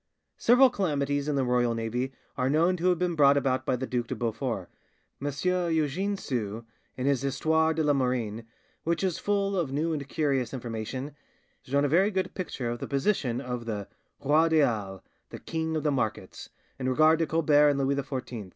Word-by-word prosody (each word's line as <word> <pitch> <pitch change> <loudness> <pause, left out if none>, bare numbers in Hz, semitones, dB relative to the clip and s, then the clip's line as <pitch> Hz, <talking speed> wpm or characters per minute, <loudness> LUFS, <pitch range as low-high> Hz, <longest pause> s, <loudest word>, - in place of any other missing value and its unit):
Several 250 +2 +6
calamities 145 - -1
in 150 - 0
the 135 - +1
royal 125 -1 +1
navy 120 +3 -2 0.2
are 130 +1 0
known 165 +5 +3
to 175 +2 0
have 180 - +2
been 180 0 0
brought 140 -3 +5
about 130 -2 0
by - - +2
the 130 +1 -3
Duc 120 -2 -2
de - - -3
Beaufort. 115 -4 -3 0.6
M. 145 - 0 0.4
Eugene 165 +6 0
Sue, 115 - -4 0.3
in 130 - -2
his 140 -3 +2
'Histoire 160 +4 +1
de 160 - +1
la 150 -1 +3
Marine', 120 -4 -1 0.4
which 170 +3 -1
is 185 -4 0
full 200 -1 0
of 170 -8 -1
new 160 +4 0
and 140 -2 -5
curious 135 -5 0
information, 125 +4 -5 0.5
has - - -19
drawn 140 +1 +3
a - - +3
very 180 +8 +3
good 190 -2 -2
picture 130 -10 -4
of 120 - -5
the - - -5
position 140 - 0
of 125 -3 -5
the 105 -3 -4 0.3
"roi 155 +4 +3
des 155 -3 +5
halles," 100 -5 -3 0.3
the - - -8
"king 160 0 -3
of 155 - -1
the 150 - +2
markets," 110 -8 -3 0.3
in 130 0 -1
regard 155 +4 +4
to 165 - +1
Colbert 150 -2 +4
and 145 - +1
Louis 135 0 +1
XIV. 130 -7 -5
140 Hz, 195 wpm, -28 LUFS, 125-160 Hz, 0.6 s, Several